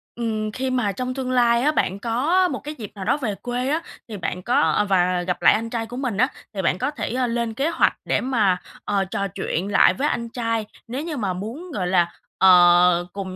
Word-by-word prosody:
ừm, 220 -2 -2
khi 260 +4 -3
mà 250 -5 0
trong 250 +6 -4
tương 255 -1 -3
lai 240 -2 +3
á, 295 +4 +3
bạn 195 -9 -1
có 280 - +2
một - - -4
cái 300 +1 -7
dịp 215 -7 -8
nào 195 -2 -6
đó - - +2
về 230 -8 -3
quê 245 +4 -3
á, 310 +3 0 0.3
thì 215 -3 -7
bạn 180 0 -4
có 245 -3 +2
và 180 -1 +2
gặp 180 - -2
lại - - +6
anh 225 +2 -2
trai 230 -1 -3
của 245 +2 -8
mình 250 -7 -2
á, 255 +4 +4 0.3
thì 195 - -2
bạn 180 0 +1
có 285 - -1
thể, - - -4
ơ, 255 0 0
lên 235 -1 -2
kế 275 +7 0
hoạch 335 - +2
để - - +1
mà, 215 -8 +2 0.3
ờ, 200 -1 0
trò 200 +1 -2
chuyện 195 0 -3
lại - - +5
với 280 +3 -1
anh 235 -5 -2
trai. 230 -2 -2 0.2
Nếu 255 +5 -4
như 320 -3 -4
mà 200 -6 -1
muốn, 235 - -7
gọi 190 -10 -2
là, 175 -2 +2 0.3
ờ, 175 -1 +6
cùng 190 -2 -6
230 Hz, 240 wpm, -22 LUFS, 195-255 Hz, 0.3 s, lại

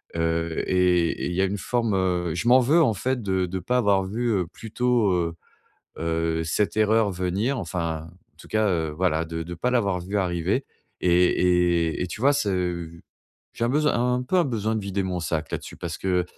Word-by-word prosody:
heu 80 0 -1
et 90 -2 +3 0.2
et - - -1
il 90 - -3
y 90 - +1
a - - +4
une 100 +2 -2
forme, 115 +1 0
heu 90 -3 0
je 95 +7 -2
m'en 125 +1 +7
veux 150 +7 +4
en 115 - +2
fait 130 +6 -1
de 95 -2 0
de 95 +1 -4
pas 125 +8 0
avoir 100 -5 +3
vu, 115 +6 -2
heu, 95 -4 +1
plus 110 +5 -11
tôt, 125 -4 +2
heu 85 -2 -1 0.6
heu, 80 0 -1
cette 95 +4 0
erreur 110 0 +3
venir. 95 +9 -1
Enfin, 80 -4 -3 0.2
en - - -40
tout - - -14
cas, 110 0 +1
heu, 80 -4 0
voilà, 85 -2 +1
de 80 0 -4
de 85 +1 -6
pas 125 +9 -1
l'avoir 100 -7 +1
vu 95 +4 -4
arriver 90 +6 0 0.4
et 90 -1 +3
et - - -1
et - - -1
tu 90 - -7
vois, 140 +4 +5
c'est 105 -7 0
v 85 -3 -3 0.6
j'ai 115 - +1
un - - +1
besoin 125 -4 +2
un 125 - -1
peu 155 +9 -1
un 175 - +4
besoin 110 -4 -1
de - - -1
vider 100 0 -2
mon 90 -1 -2
sac 80 -2 -2
là-dessus. - - -5
Parce - - -5
que 90 -2 0
95 Hz, 220 wpm, -24 LUFS, 85-110 Hz, 0.6 s, m'en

